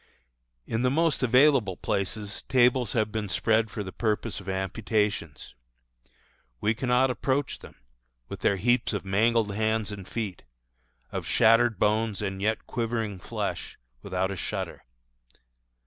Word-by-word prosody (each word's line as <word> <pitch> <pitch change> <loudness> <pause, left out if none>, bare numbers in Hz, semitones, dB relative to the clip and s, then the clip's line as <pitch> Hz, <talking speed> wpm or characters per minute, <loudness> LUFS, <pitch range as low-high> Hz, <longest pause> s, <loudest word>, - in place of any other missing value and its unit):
In 115 - -2
the 125 - +3
most 160 +3 +1
available 125 -6 +4
places 100 0 -2
tables 125 -2 +3
have 110 -3 +1
been 105 -2 -3
spread 110 +4 +2
for 105 - -5
the 95 - -7
purpose 110 -1 -1
of 100 -1 -8
amputations. 95 - -2 1.1
We 110 - +2
cannot 125 +2 +2
approach 135 +4 -1
them, - - -13 0.5
with - - -7
their 100 - +2
heaps 120 +4 +1
of 105 - -3
mangled 105 +2 +2
hands 110 0 0
and 100 -3 -8
feet, 105 -6 -4 0.7
of - - -4
shattered 115 -1 +4
bones 105 +1 +1
and 95 -2 -3
yet 110 +2 0
quivering 115 -4 -2
flesh, - - -4 0.2
without 95 +5 -1
a - - -3
shudder. - - -4
110 Hz, 135 wpm, -27 LUFS, 100-120 Hz, 1.1 s, available